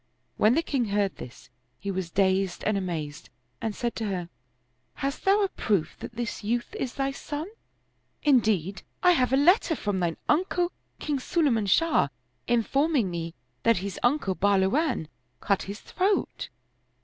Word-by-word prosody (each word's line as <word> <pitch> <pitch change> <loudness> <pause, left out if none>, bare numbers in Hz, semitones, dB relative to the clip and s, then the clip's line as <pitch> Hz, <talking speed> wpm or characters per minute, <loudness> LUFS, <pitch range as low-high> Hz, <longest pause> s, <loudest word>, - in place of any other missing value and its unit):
When 220 +4 +4
the 330 - +2
king 270 -7 0
heard 200 -2 0
this, 125 0 -11 0.3
he 200 - -4
was 185 -3 -3
dazed 190 0 +1
and 215 - +1
amazed 165 -5 -4 0.3
and 220 -2 -2
said 240 -1 -2
to 225 - -2
her, 180 -3 -3 0.3
" 125 +1 -45
Hast 275 0 -3
thou 400 +2 +5
a - - +3
proof 200 - -1
that 230 - -8
this 235 -2 -4
youth 240 +3 -1
is 255 - -4
thy 275 0 0
son? 295 +3 -5 0.8
Indeed, 210 - +2 0.2
I 360 - +7
have 255 -8 +2
a 265 - +4
letter 340 - +4
from 205 -7 -2
thine 170 -2 -1
uncle 355 +2 +2 0.3
King 290 -2 -2
Sulayman 255 - +1
Shah, 330 - +4 0.4
informing 245 - +2
me 170 0 -4 0.3
that 230 -1 +4
his 200 - -5
uncle 245 -6 +2
Bahluwan 200 - +2 0.3
cut 200 -2 +1
his 205 +2 -6
throat." 390 +2 -1
225 Hz, 160 wpm, -27 LUFS, 190-285 Hz, 0.8 s, I